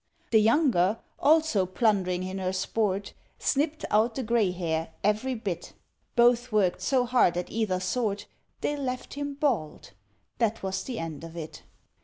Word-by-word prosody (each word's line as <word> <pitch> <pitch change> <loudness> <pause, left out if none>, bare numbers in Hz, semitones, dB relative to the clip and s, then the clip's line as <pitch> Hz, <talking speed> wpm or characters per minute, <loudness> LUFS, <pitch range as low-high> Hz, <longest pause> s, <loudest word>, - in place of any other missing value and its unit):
The 220 -2 +6
younger, 225 - +3 0.2
also 300 - +3
plundering 185 -3 +1
in 185 +1 -4
her 185 0 -1
sport, 200 +1 -1 0.2
Snipped 300 +2 0
out 225 +2 +3
the 265 - -2
grey 225 -3 +2
hair, 165 -3 -3
every 215 +6 +1
bit. 190 -6 -5 0.4
Both 240 0 +4
worked 200 -4 +2
so 255 -2 +2
hard 245 -8 +3
at 180 - -3
either 210 -5 0
sort, 205 +1 -1 0.4
They 295 - 0
left 255 -3 -4
him 285 0 -4
bald 235 - -1 0.5
that 225 -2 0
was 190 0 -2
the 250 -3 -4
end 165 -2 -5
of 165 +1 -9
it. 160 -2 -7
215 Hz, 155 wpm, -27 LUFS, 185-250 Hz, 0.5 s, The